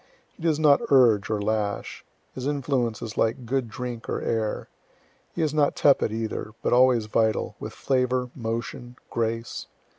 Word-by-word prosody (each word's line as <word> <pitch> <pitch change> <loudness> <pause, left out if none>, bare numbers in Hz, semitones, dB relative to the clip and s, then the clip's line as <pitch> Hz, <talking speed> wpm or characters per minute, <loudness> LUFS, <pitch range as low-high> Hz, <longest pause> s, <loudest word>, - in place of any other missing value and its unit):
He - - -17
does 160 -2 +1
not 145 -2 +5
urge 120 -7 +5
or 110 -1 0
lash. 105 -1 -2 0.3
His 130 +1 -4
influence 130 -5 -1
is 110 -2 -5
like 115 +3 0
good 125 0 -1
drink 120 0 -6
or - - -1
air. 110 -2 -2 0.7
He 170 - 0
is 155 -2 0
not 150 -2 +2
tepid 140 -6 +3
either, 110 -1 -4
but - - +1
always 125 -2 +5
vital, 110 0 0
with - - -6
flavor, 125 -1 0
motion, 115 +1 -5 0.2
grace. 115 0 -2
120 Hz, 155 wpm, -25 LUFS, 110-135 Hz, 0.7 s, not